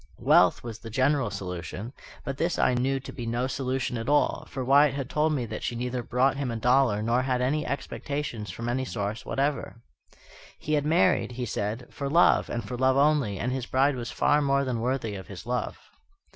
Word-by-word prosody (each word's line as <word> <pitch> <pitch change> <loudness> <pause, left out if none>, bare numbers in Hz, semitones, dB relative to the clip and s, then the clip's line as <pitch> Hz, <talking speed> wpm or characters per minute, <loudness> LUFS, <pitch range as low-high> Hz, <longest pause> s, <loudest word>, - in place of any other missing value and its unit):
Wealth - - +4
was 115 -2 -7
the 115 - -9
general 130 +1 +1
solution, 95 +4 -6 0.3
but 135 -1 -4
this 170 +3 0
I - - +3
knew 135 +2 0
to 135 - -9
be 120 -2 -6
no 120 +2 0
solution 130 -2 -2
at 115 +4 -4
all; 145 0 +2
for 130 -1 -4
Wyatt 140 +1 +5
had 135 -2 -4
told 155 +1 +2
me 130 -5 -1
that 110 -1 -6
she 120 - -3
neither 125 +1 -2
brought 125 +3 +1
him 140 -3 -2
a 115 - -3
dollar 120 -2 +2
nor 120 +3 +2
had 130 -1 0
any 145 +5 0
expectations 140 -6 -4
from 115 +6 -5
any 125 +2 0
source 105 -3 -4
whatever. 140 -4 -2 0.7
"He 155 - -3
had 145 -1 +1
married," 160 -5 +3
he 125 0 -3
said, 110 +2 -3
"for 140 -1 -4
love, 170 +4 +4
and 120 - -4
for 125 - -4
love 130 +1 +3
only; 140 -8 +2
and 125 +5 -2
his 130 -1 -3
bride 135 +2 +2
was 120 -2 -5
far 150 0 +2
more 140 -1 +2
than 120 -3 -2
worthy 125 -3 -1
of 95 -1 -8
his 100 +1 -9
love." 125 +1 -2
125 Hz, 210 wpm, -27 LUFS, 115-140 Hz, 0.7 s, Wyatt